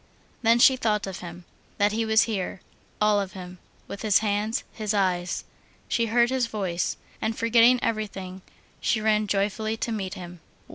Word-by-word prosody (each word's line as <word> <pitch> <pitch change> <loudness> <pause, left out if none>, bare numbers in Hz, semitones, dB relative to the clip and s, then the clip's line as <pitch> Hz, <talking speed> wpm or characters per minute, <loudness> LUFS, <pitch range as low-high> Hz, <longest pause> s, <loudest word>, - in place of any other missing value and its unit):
Then 230 0 +4
she 260 +2 +6
thought 210 -4 0
of 190 -1 -6
him, 175 0 -9 0.3
that 205 0 +3
he 225 +1 -1
was 220 +1 +4
here, 200 -5 -3 0.4
all 210 -1 +3
of 195 0 -6
him, 180 -2 -9 0.3
with 200 - -7
his 215 -3 +4
hands, 210 +1 0
his 215 -1 -2
eyes. 180 -2 0 0.4
She 230 -1 +1
heard 235 +2 +3
his 260 -2 +1
voice. 190 -6 -2 0.2
And 220 0 -1
forgetting 235 +2 +5
everything, 195 -4 -3 0.4
she 220 - +1
ran 215 -1 +2
joyfully 210 +3 -1
to 230 - -3
meet 195 -4 -3
him. 175 -1 -9
210 Hz, 170 wpm, -25 LUFS, 190-225 Hz, 0.4 s, she